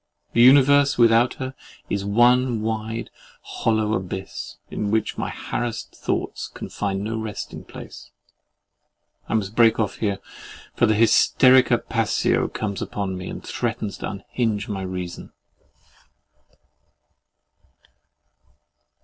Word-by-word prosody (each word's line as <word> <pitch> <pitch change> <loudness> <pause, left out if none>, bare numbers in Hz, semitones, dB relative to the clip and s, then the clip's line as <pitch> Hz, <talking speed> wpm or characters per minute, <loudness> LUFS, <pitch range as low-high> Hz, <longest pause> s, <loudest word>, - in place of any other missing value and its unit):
The 115 - +4
universe 140 +3 +6
without 115 +1 +4
her 130 0 -5 0.3
is 100 -1 -2
one 120 +2 +3
wide, 110 +1 -3 0.3
hollow 110 -1 0
abyss, 95 -1 -5
in 105 - -2
which 110 0 0
my - - -3
harassed 120 -2 -4
thoughts - - -3
can - - -9
find 100 -1 -2
no 110 +1 -3
resting 110 -2 -6
place. - - -11 1.2
I - - 0
must 105 -2 -1
break 115 -1 +5
off 105 -3 -1
here; 100 -3 -1 0.6
for 120 - +3
the 110 - +3
hysterica 125 +3 +5
passio - - +1
comes 100 -2 -4
upon 95 -2 -3
me, 90 0 -6
and - - -7
threatens 115 -4 -3
to - - -4
unhinge 105 +1 -2
my 100 -2 -4
reason. 90 -1 -6
110 Hz, 115 wpm, -23 LUFS, 100-120 Hz, 1.2 s, universe